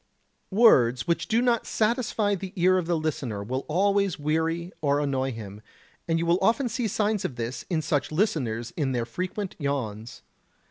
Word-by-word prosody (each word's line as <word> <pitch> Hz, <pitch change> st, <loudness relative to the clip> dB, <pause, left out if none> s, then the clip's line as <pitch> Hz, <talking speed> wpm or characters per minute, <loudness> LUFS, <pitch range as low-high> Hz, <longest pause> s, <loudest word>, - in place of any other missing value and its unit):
Words 130 Hz, -, +5 dB
which 170 Hz, -1 st, 0 dB
do 230 Hz, +2 st, +2 dB
not 240 Hz, -2 st, +1 dB
satisfy 220 Hz, -2 st, +1 dB
the 190 Hz, -1 st, -5 dB
ear 185 Hz, +1 st, +4 dB
of 170 Hz, -, -4 dB
the 170 Hz, -1 st, +1 dB
listener 135 Hz, -10 st, -3 dB
will 130 Hz, +5 st, -3 dB
always 200 Hz, +2 st, +2 dB
weary 160 Hz, +3 st, -1 dB
or 145 Hz, -1 st, +2 dB
annoy 135 Hz, -2 st, 0 dB
him; 105 Hz, -3 st, -8 dB, 0.5 s
and 165 Hz, -1 st, +1 dB
you 165 Hz, -, -1 dB
will 170 Hz, +2 st, +3 dB
often 235 Hz, +6 st, +2 dB
see 235 Hz, +1 st, -1 dB
signs 210 Hz, 0 st, 0 dB
of 130 Hz, -, -3 dB
this 120 Hz, +1 st, -4 dB
in 160 Hz, -4 st, 0 dB
such 145 Hz, -2 st, 0 dB
listeners 130 Hz, -, -1 dB
in 140 Hz, -5 st, -1 dB
their 120 Hz, -2 st, -1 dB
frequent 185 Hz, -, -4 dB
yawns. 115 Hz, -6 st, -4 dB
160 Hz, 175 wpm, -26 LUFS, 130-200 Hz, 0.5 s, Words